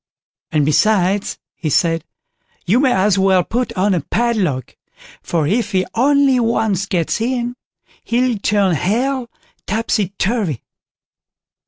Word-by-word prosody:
"And, 150 Hz, -2 st, +2 dB
besides", 195 Hz, +4 st, +2 dB, 0.2 s
he 160 Hz, -, -4 dB
said, 165 Hz, +3 st, +1 dB, 0.6 s
"you 205 Hz, +8 st, +3 dB
may 265 Hz, -2 st, +3 dB
as 195 Hz, -1 st, +2 dB
well 190 Hz, -1 st, +3 dB
put 240 Hz, +4 st, -2 dB
on 200 Hz, -1 st, +1 dB
a 175 Hz, -, 0 dB
padlock, 195 Hz, -, -1 dB, 0.5 s
for 165 Hz, -3 st, -1 dB
if 215 Hz, +9 st, 0 dB
he 185 Hz, -1 st, +2 dB
only 275 Hz, +1 st, +3 dB
once 220 Hz, -4 st, 0 dB
gets 175 Hz, +3 st, -1 dB
in, 245 Hz, 0 st, -1 dB, 0.5 s
he'll 240 Hz, -2 st, 0 dB
turn 200 Hz, -2 st, +2 dB
Hell 240 Hz, -, -1 dB, 0.4 s
topsy 210 Hz, -2 st, 0 dB
turvy!" 195 Hz, -, -1 dB
205 Hz, 125 wpm, -18 LUFS, 180-235 Hz, 0.6 s, you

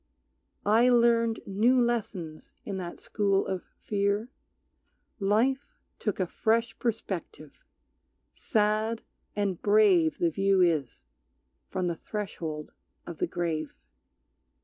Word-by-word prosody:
I 225 Hz, +4 st, +5 dB
learned 235 Hz, -2 st, +3 dB
new 230 Hz, +6 st, +3 dB
lessons 200 Hz, -10 st, -2 dB
in 195 Hz, -, -4 dB
that 175 Hz, -2 st, -6 dB
school 200 Hz, -2 st, +1 dB
of 190 Hz, -2 st, -3 dB, 0.2 s
fear, 205 Hz, +3 st, -1 dB, 0.9 s
Life 230 Hz, +8 st, +2 dB, 0.3 s
took 210 Hz, -3 st, -2 dB
a 185 Hz, -, +2 dB
fresh 225 Hz, +5 st, 0 dB
perspective; 190 Hz, -, -4 dB, 0.7 s
sad 215 Hz, 0 st, 0 dB, 0.3 s
and 200 Hz, -4 st, -1 dB
brave 200 Hz, -6 st, +4 dB
The 170 Hz, -1 st, +1 dB
view 195 Hz, +3 st, +2 dB
is 150 Hz, -, +1 dB, 0.6 s
from 185 Hz, -1 st, -2 dB
the 170 Hz, -2 st, -1 dB
threshold 165 Hz, -7 st, -5 dB, 0.3 s
of 170 Hz, -3 st, -8 dB
the -, -, +1 dB
grave. 165 Hz, -4 st, -3 dB
200 Hz, 105 wpm, -28 LUFS, 175-225 Hz, 0.9 s, I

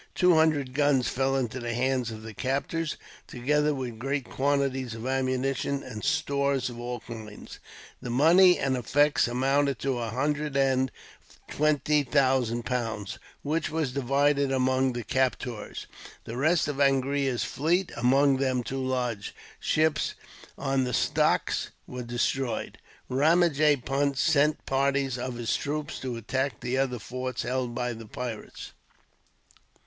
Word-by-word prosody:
Two 180 Hz, -1 st, +5 dB
hundred 155 Hz, -5 st, +2 dB
guns 145 Hz, -3 st, +2 dB
fell 135 Hz, +1 st, 0 dB
into 130 Hz, -2 st, -2 dB
the 120 Hz, -1 st, -3 dB
hands 130 Hz, -1 st, 0 dB
of 110 Hz, -1 st, -8 dB
the 110 Hz, 0 st, -8 dB
captors, 140 Hz, +6 st, -2 dB, 0.3 s
together 150 Hz, +4 st, +1 dB
with 125 Hz, -4 st, -5 dB
great 135 Hz, +1 st, -2 dB
quantities 135 Hz, -3 st, 0 dB
of 115 Hz, +1 st, -7 dB
ammunition, 135 Hz, +1 st, -1 dB
and 110 Hz, -4 st, -8 dB
stores 140 Hz, -4 st, 0 dB
of 120 Hz, -, -9 dB
all 120 Hz, 0 st, -4 dB
kinds. 110 Hz, -3 st, -10 dB, 0.4 s
The 125 Hz, -, -6 dB
money 170 Hz, +9 st, +6 dB
and 135 Hz, -1 st, 0 dB
effects 145 Hz, +4 st, +2 dB
amounted 135 Hz, +2 st, +1 dB
to 135 Hz, -3 st, -1 dB
a 115 Hz, -1 st, -3 dB
hundred 145 Hz, +4 st, -1 dB
and 130 Hz, -1 st, +2 dB, 0.6 s
twenty 150 Hz, 0 st, +2 dB
thousand 130 Hz, -4 st, +1 dB
pounds, 115 Hz, -3 st, -3 dB, 0.2 s
which 160 Hz, +3 st, -1 dB
was 155 Hz, -4 st, -1 dB
divided 140 Hz, +1 st, +2 dB
among 130 Hz, 0 st, +2 dB
the 120 Hz, -1 st, -4 dB
captors. 125 Hz, -1 st, -2 dB, 0.4 s
The 115 Hz, -, -7 dB
rest 155 Hz, +5 st, +2 dB
of 145 Hz, -2 st, -3 dB
Angria's 135 Hz, -1 st, +2 dB
fleet, 175 Hz, +7 st, 0 dB
among 135 Hz, +3 st, +3 dB
them 130 Hz, -2 st, 0 dB
two 135 Hz, +2 st, -3 dB
large 125 Hz, -5 st, -2 dB, 0.2 s
ships 155 Hz, -1 st, +1 dB, 0.4 s
on 135 Hz, -1 st, 0 dB
the 125 Hz, -1 st, -2 dB
stocks, -, -, +1 dB, 0.2 s
was 125 Hz, -1 st, -7 dB
destroyed. 120 Hz, 0 st, -2 dB, 0.3 s
Ramajee 150 Hz, -1 st, +3 dB
Punt 140 Hz, 0 st, 0 dB
sent 150 Hz, 0 st, +2 dB
parties 135 Hz, -1 st, 0 dB
of 125 Hz, 0 st, -4 dB
his 120 Hz, -1 st, -1 dB
troops 150 Hz, +1 st, -3 dB
to 125 Hz, -3 st, -4 dB
attack 130 Hz, +2 st, -2 dB
the 125 Hz, +1 st, -2 dB
other 130 Hz, -2 st, 0 dB
forts 125 Hz, +2 st, -4 dB
held 125 Hz, -1 st, -2 dB
by 125 Hz, 0 st, -1 dB
the 115 Hz, -1 st, -10 dB
pirates. 120 Hz, -1 st, -7 dB
135 Hz, 140 wpm, -27 LUFS, 125-140 Hz, 0.6 s, money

